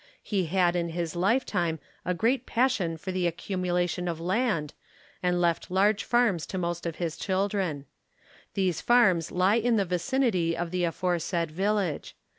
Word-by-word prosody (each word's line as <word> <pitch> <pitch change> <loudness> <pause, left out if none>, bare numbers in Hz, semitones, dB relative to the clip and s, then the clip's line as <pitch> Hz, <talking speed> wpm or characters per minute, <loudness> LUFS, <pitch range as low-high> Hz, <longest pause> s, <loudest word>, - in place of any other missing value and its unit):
He 195 -4 0
had 180 0 +2
in 170 -1 0
his 170 -1 -3
lifetime 180 -4 +1 0.3
a 180 - 0
great 240 +6 +1
pas 255 +3 +3
sion 170 -9 -2
for 185 +4 -5
the 185 -1 0
accumulation 180 0 -1
of 165 -2 -3
land 180 - 0 0.5
and 180 -1 +1
left 170 -1 +1
large 200 +3 +2
farms 235 -9 +2
to 190 - -4
most 175 -1 -2
of 165 - -4
his 170 -3 -3
children. 190 -6 -1 0.7
These 185 -4 0
farms 190 -9 +4
lie 185 +4 +3
in 235 0 +2
the 200 -3 +2
vicinity 180 -2 0
of 170 0 -3
the 180 -1 +1
aforesaid 170 -1 -1
village. 195 -1 -1
180 Hz, 160 wpm, -27 LUFS, 170-200 Hz, 0.7 s, farms